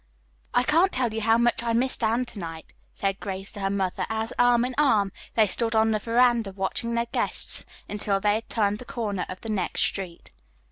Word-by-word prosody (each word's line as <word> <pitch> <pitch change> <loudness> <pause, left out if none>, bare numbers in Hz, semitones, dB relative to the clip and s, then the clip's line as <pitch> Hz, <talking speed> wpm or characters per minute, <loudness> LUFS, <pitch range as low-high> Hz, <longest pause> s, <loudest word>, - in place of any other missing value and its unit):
"I 245 - +4
can't 330 +8 +3
tell 245 -4 0
you 225 - -2
how 225 +1 +4
much 235 0 +2
I 235 -1 -1
missed 250 +1 +1
Anne 230 +3 +2
to 225 - -9
night," 165 -2 -8 0.2
said 195 0 -2
Grace 195 -1 -5
to - - -9
her 195 -1 0
mother 195 -2 -1
as, 220 +1 -2
arm 245 0 +5
in 255 - -3
arm, 220 -10 +3 0.2
they 220 - +5
stood 225 +3 0
on 220 0 +4
the 215 - +1
veranda 235 -1 +2
watching 200 +5 -2
their 235 0 +1
guests 235 - -1 0.2
until 205 -1 -1
they 205 +1 +2
had 220 +2 -3
turned 210 -2 0
the 250 - -9
corner 220 -8 -3
of 185 - -7
the 225 - -6
next 195 -5 0
street. 185 -4 -3
220 Hz, 215 wpm, -26 LUFS, 200-235 Hz, 0.2 s, arm